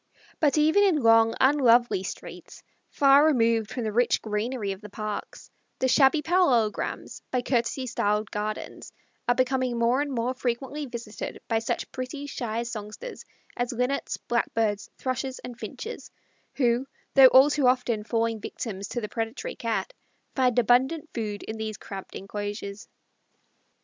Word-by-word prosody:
But 300 -1 +3
even 315 +6 +4
in 355 -9 +3
long, 225 0 +5
unlovely 245 -7 +4
streets, 190 - -9 0.3
far 280 0 +5
removed 230 -7 +3
from 245 - -4
the 215 - -1
rich 240 +3 +2
greenery 215 0 -2
of 195 +1 -7
the 210 - -10
parks, 215 0 -6 0.3
the 260 - +1
shabby 275 +3 +4
parallelograms, 280 -11 +1
by 250 -1 -1
courtesy 250 +1 0
styled 210 -3 -1
gardens, 210 +1 -5 0.4
are 245 - +4
becoming 255 -1 +1
more 235 +4 +2
and 290 -1 -2
more 245 0 -1
frequently 265 +4 -3
visited 235 -3 -7
by 225 -1 +1
such 225 - -3
pretty 260 +3 -5
shy 235 -4 -3
songsters 230 - -7 0.3
as 245 0 -2
Linnets, 250 +3 -1
Blackbirds, 225 -3 -1
Thrushes, 255 0 -3
and 245 -1 -9
Finches, 465 +2 -7 0.5
who, 245 0 +1 0.3
though 270 -1 +9
all 265 +3 +6
too 285 -3 +2
often 250 -4 +1
falling 230 0 0
victims 200 -2 -5
to 240 - -4
the 210 - -3
predatory 225 +3 -4
Cat, 230 - -2 0.4
find 250 -3 +2
abundant 260 +7 +2
food 210 -3 -4
in 220 - -6
these 220 -1 -4
cramped 195 -1 -9
enclosures. 205 +2 -6
240 Hz, 145 wpm, -26 LUFS, 220-265 Hz, 0.5 s, though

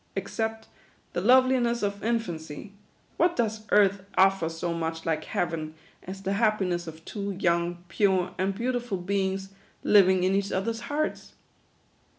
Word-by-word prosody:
Except 220 0 -3 0.5
the - - -1
loveliness 245 0 +4
of 200 0 -2
in 235 +1 +2
fancy, 160 -3 -7 0.5
what 345 0 +3
does 220 -2 -2
earth 200 -1 +4
offer 190 -3 +4
so 165 +1 -3
much 165 0 -3
like 160 -2 -1
Heaven, 160 -3 -2 0.3
as 195 +1 -8
the 195 +1 0
happiness 195 -5 +1
of 160 0 -10
two 200 -1 -4
young, 175 -1 0
pure, 185 0 +1
and 190 +1 0
beautiful 240 -2 -2
be 190 +2 0
ings, 190 0 -4 0.3
living 190 -2 +5
in 185 +1 +2
each 200 0 0
other's 225 +4 -1
hearts 290 +7 -3
195 Hz, 150 wpm, -27 LUFS, 175-220 Hz, 0.5 s, living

